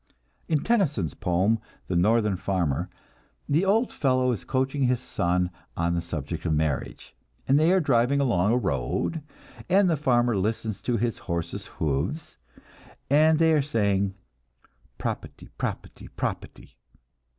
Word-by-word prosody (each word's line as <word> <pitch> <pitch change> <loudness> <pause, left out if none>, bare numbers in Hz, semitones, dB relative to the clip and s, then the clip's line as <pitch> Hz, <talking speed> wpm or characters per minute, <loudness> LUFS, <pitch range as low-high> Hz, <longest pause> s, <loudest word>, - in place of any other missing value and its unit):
In 155 -3 +1
Tennyson's 150 - +1
poem, 95 +6 +1 0.3
"The 90 - -2
Northern 105 +3 +3
Farmer," 90 -4 -1 0.6
the 155 +5 +2
old 220 +5 +2
fellow 130 -2 +2
is 115 - -3
coaching 135 +1 0
his 125 -1 +2
son 90 -6 0 0.3
on 85 +1 +1
the 85 - 0
subject 80 -1 -5
of 80 - 0
marriage, 75 -2 -2 0.3
and 135 +2 +4
they 160 +3 +4
are 190 - +4
driving 140 -2 +2
along 105 -7 +2
a 120 - +3
road, 75 - -1 0.5
and 190 +1 +5
the 170 - +3
farmer 120 -5 +2
listens 110 +1 -2
to 120 -2 0
his 115 0 -1
horses' 85 0 -3
hoofs, 80 - -3 0.7
and 155 +2 +5
they 160 0 +4
are 150 - +4
saying, 100 -8 0 0.8
"Proputty, - - -5
proputty, - - -5
proputty!" - - -5
115 Hz, 140 wpm, -26 LUFS, 90-145 Hz, 0.8 s, and